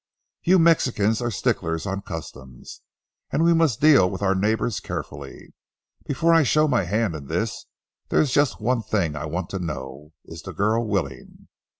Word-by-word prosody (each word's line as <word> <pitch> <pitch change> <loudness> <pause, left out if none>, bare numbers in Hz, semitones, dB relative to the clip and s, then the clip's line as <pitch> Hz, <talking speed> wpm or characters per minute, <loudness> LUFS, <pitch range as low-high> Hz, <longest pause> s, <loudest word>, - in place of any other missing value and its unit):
You 185 +2 +4
Mexicans 125 - +2
are 120 - -1
sticklers 80 -5 -1
on 100 0 -3
customs, 65 - -9 0.5
and 160 - 0
we 170 0 +5
must 160 -8 +2
deal 140 -12 +5
with 95 +1 -5
our 95 -1 +3
neighbors 110 +3 0
carefully. 70 -1 -8 0.5
Before 165 +4 +2
I 165 - +6
show 155 +2 +3
my 125 -9 +1
hand 105 +1 0
in 75 -3 -8
this, - - -3 0.4
there's 145 - +2
just 145 -1 +2
one 120 +2 0
thing 95 -8 -1
I 75 - -4
want 90 0 -4
to 95 - -3
know—is 75 +1 -8
the 95 - -8
girl 110 +6 0
willing? 100 -4 -4
100 Hz, 165 wpm, -23 LUFS, 80-130 Hz, 0.5 s, I